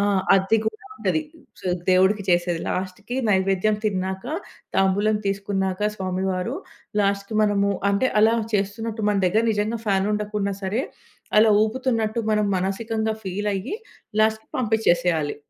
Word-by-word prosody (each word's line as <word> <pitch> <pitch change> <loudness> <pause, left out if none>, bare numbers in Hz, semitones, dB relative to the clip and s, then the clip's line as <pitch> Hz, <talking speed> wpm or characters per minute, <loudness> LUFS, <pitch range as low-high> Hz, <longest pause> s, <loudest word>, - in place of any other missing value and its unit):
ఆ! - - +2 0.3
అది 195 +3 +3
కూడా 435 - -1 0.2
ఉంటది. 315 - 0 0.4
స్ - - -21 0.3
దేవుడికి 190 +3 +4
చేసేది 175 -1 +2
లాస్ట్‌కి 190 +6 -4
నైవేద్యం 195 +1 +2
తిన్నాక, 190 +1 -2 0.5
తాంబూలం 200 +3 +3
తీసుకున్నాక, 195 -1 -1 0.2
స్వామివారు 185 -1 -2 0.5
లాస్ట్‌కి 200 +1 0
మనము 200 -1 +2 0.2
అంటే 200 +6 +2
అలా 225 +2 +5 0.2
చేస్తున్నట్టు 215 +2 -2
మన 205 - +2
దగ్గర 210 +5 +2
నిజంగా 215 +2 -1
ఫ్యాన్ 195 -1 +2
ఉండకున్నా 210 -1 -1
సరే 205 +7 0 0.6
అలా 220 +1 +6
ఊపుతున్నట్టు 225 -1 0
మనం 210 -1 +2
మనసికంగా 220 +4 -1
ఫీల్ 205 +3 -2
అయ్యి 195 - -3 0.5
లాస్ట్‌కి 220 0 +1
పంపించేసేయాలి. 175 -9 +1
200 Hz, 125 wpm, -23 LUFS, 190-220 Hz, 0.6 s, అలా